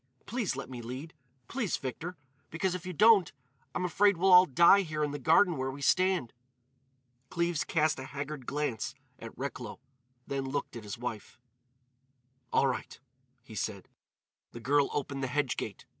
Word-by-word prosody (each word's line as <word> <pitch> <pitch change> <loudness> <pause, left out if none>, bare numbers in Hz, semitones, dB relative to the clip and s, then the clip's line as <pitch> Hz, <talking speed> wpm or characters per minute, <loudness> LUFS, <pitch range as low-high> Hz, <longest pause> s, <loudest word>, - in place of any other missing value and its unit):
Please 225 - -2
let 135 - -5
me 125 -2 -7
lead! 130 +7 -7 0.3
Please, 235 -7 -1
Victor. 165 +7 -5 0.3
Because, 175 +3 -1
if 180 0 -5
you - - -3
don't, 210 -1 +6 0.4
I'm 180 - 0
afraid 200 +1 +3
we'll 185 +2 +4
all 180 +1 +9
die 170 +8 +6
here 155 -4 -2
in 145 - -1
the 145 - -5
garden 165 +5 +4
where 130 0 -1
we 135 +2 -7
stand." 185 -7 +2 1.0
Cleves 170 -3 0
cast 155 -3 +1
a 130 - -6
haggard 140 -1 -6
glance 145 -7 -2 0.2
at - - -7
Recklow, - - -5 0.5
then 135 -1 -3
looked 140 0 -3
at 115 -3 -8
his 105 +3 -6
wife. 115 -3 -6 1.1
"All - - +3
right," 130 -2 -3 0.4
he 120 - -13
said. 100 -2 -4 0.7
The 120 - -7
girl 140 +4 +2
opened 140 -1 -3
the 130 - -1
hedge 140 0 0
gate. - - -6
145 Hz, 165 wpm, -30 LUFS, 130-180 Hz, 1.1 s, all